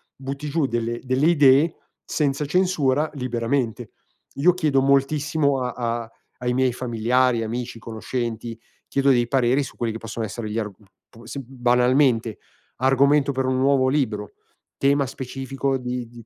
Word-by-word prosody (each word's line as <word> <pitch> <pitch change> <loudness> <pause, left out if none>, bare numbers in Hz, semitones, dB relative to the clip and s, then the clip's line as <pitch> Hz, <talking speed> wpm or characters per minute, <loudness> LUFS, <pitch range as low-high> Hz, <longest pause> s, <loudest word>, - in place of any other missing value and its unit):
butti 140 +2 -6
giù 155 -1 +1
delle 120 -1 -2
delle 130 +4 +1
idee 145 0 +5 0.3
senza 145 -1 -1
censura 150 -4 +1
liberamente. 120 -2 -2 0.4
Io 170 +6 +4
chiedo 150 -7 +1
moltissimo 140 +1 +2
a 125 - -2 0.3
a 115 - -15 0.3
ai 125 0 -1
miei 130 -1 +2
familiari, 120 0 +1
amici, 120 +1 -4
conoscenti, 115 0 -5 0.3
chiedo 140 0 +1
dei 120 -2 +2
pareri 130 +1 +2
su 135 - -7
quelli 115 -2 -1
che 115 - -6
possono 115 0 -5
essere 110 +1 -5
gli 105 - -4
arg 105 -2 -2
p 105 - -24 0.4
p - - -14
sì, 140 - -5
banalmente 125 -2 +2 0.4
argomento 140 +2 +3
per 130 0 -1
un 130 0 0
nuovo 135 -1 +3
libro, 110 -8 -1 0.5
tema 140 0 +2
specifico 135 +1 -3
di 125 -1 -4
di 115 -1 -14
130 Hz, 150 wpm, -23 LUFS, 120-140 Hz, 0.5 s, idee